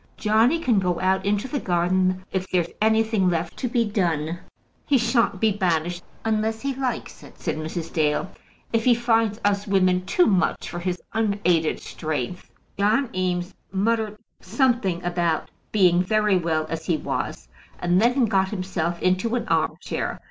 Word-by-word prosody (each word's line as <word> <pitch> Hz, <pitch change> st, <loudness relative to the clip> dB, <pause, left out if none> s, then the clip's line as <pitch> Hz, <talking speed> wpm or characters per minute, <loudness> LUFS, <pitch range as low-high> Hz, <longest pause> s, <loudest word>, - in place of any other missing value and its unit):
Johnny 225 Hz, +8 st, +3 dB
can 250 Hz, -11 st, +2 dB
go 180 Hz, -2 st, 0 dB
out 190 Hz, 0 st, +1 dB
into 205 Hz, +4 st, 0 dB
the 285 Hz, +1 st, -2 dB
garden 185 Hz, +1 st, +1 dB
if 190 Hz, 0 st, -2 dB
there's 175 Hz, -2 st, 0 dB
anything 220 Hz, -3 st, +3 dB
left 170 Hz, -1 st, -2 dB
to 255 Hz, -, -2 dB
be 235 Hz, -1 st, +1 dB
done." 170 Hz, -5 st, -1 dB, 0.5 s
"He 280 Hz, -, +4 dB
shan't 230 Hz, -4 st, +1 dB
be 220 Hz, +1 st, +3 dB
banished 175 Hz, -3 st, 0 dB, 0.2 s
unless 220 Hz, 0 st, 0 dB
he 275 Hz, 0 st, -1 dB
likes 260 Hz, -1 st, -4 dB
it," -, -, -15 dB
said -, -, -2 dB
Mrs. 160 Hz, +1 st, -5 dB
Dale. 155 Hz, +3 st, 0 dB, 0.4 s
"If 225 Hz, -1 st, +2 dB
he 245 Hz, -2 st, +6 dB
finds 225 Hz, -2 st, +1 dB
us 205 Hz, 0 st, +1 dB
women 185 Hz, -2 st, +2 dB
too 360 Hz, -, +4 dB
much 185 Hz, -3 st, +1 dB
for 175 Hz, -, -5 dB
his 180 Hz, 0 st, -3 dB
unaided 200 Hz, -7 st, +1 dB
strength 155 Hz, +2 st, -4 dB, 0.2 s
" -, -, -31 dB
John 225 Hz, +6 st, +2 dB
Eames 180 Hz, 0 st, -1 dB, 0.2 s
muttered 215 Hz, +2 st, 0 dB, 0.2 s
something 235 Hz, -, 0 dB
about 170 Hz, -2 st, -1 dB, 0.2 s
being 180 Hz, -4 st, +4 dB
very 210 Hz, +1 st, +2 dB
well 165 Hz, -3 st, 0 dB
as 160 Hz, 0 st, -5 dB
he 165 Hz, -, +2 dB
was, 65 Hz, -, -4 dB, 0.3 s
and 175 Hz, +2 st, +2 dB
then 245 Hz, +2 st, +3 dB
got 190 Hz, -3 st, +1 dB
himself 185 Hz, -4 st, -2 dB
into 185 Hz, +6 st, +1 dB
an 235 Hz, -1 st, -2 dB
arm -, -, +1 dB
chair. -, -, -3 dB
190 Hz, 165 wpm, -24 LUFS, 175-225 Hz, 0.5 s, he